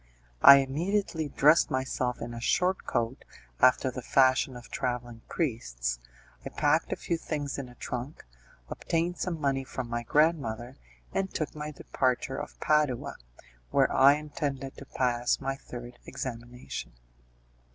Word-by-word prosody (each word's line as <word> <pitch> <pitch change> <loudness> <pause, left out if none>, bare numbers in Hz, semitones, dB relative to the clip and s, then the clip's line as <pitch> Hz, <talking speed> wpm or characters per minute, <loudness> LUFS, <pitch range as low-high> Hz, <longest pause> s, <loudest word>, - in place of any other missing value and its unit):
I 140 - +11
immediately 160 +4 0
dressed 150 +5 +5
myself 130 -2 -2
in 120 0 -6
a 115 - -7
short 185 +9 +1
coat, 120 +2 -1 0.4
after 130 0 +4
the 125 - -6
fashion 130 +1 +3
of 120 -1 -12
travelling 120 -2 -3
priests, - - -2 0.4
I - - -5
packed - - +1
a - - +1
few 170 - -2
things 145 -4 -3
in 130 -2 -6
a 125 - -15
trunk, 125 - -6 0.4
obtained 170 - -2
some 170 -3 -2
money 135 -2 0
from 130 -1 -5
my 120 0 -2
grandmother, 125 -4 +1 0.4
and 195 -1 -1
took 155 - -3
my 150 0 -5
departure 135 -1 -1
for - - -11
Padua, 150 -5 +1 0.5
where - - +3
I 135 +1 +7
intended 145 -2 -4
to 140 - -9
pass 120 -1 0
my 135 0 -2
third 120 -2 -10
examination. 125 - -6
135 Hz, 140 wpm, -29 LUFS, 120-150 Hz, 0.5 s, I